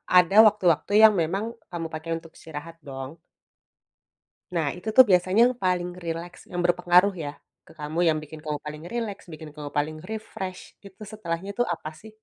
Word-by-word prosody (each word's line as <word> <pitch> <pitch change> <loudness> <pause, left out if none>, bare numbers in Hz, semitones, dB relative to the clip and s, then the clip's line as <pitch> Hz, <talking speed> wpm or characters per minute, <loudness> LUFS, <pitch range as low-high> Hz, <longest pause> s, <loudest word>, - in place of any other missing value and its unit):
ada 180 +1 +6
waktu-waktu 185 -5 +1
yang 215 - +7
memang 190 +6 -1 0.3
kamu 170 -2 -4
pakai 160 +1 -5
untuk 165 0 -13
istirahat, 160 +1 -9
dong? 135 -1 -6 1.4
Nah, 160 -3 +1
itu 180 +5 -5
tuh, 260 - +10
biasanya 185 +3 +4
yang 250 - +2
paling 180 -1 +1 0.2
rileks 170 +1 -5
yang 175 0 -2
berpengaruh 180 +2 +4
ya, 160 -5 -5 0.4
ke - - -15
kamu, 150 +3 -3
yang 155 -1 +3
bikin 155 +1 -9
kamu 150 -1 -3
paling 150 +1 -7
rileks, 225 -4 -4
bikin 155 0 -9
kamu 150 -1 -7
paling 155 +2 -1
refresh, 190 -2 -7
itu 195 +1 -15
setelahnya 185 -2 -4
tuh, 245 - +2
apa 155 -2 -6
sih? 220 - -12
175 Hz, 170 wpm, -25 LUFS, 155-195 Hz, 1.4 s, tuh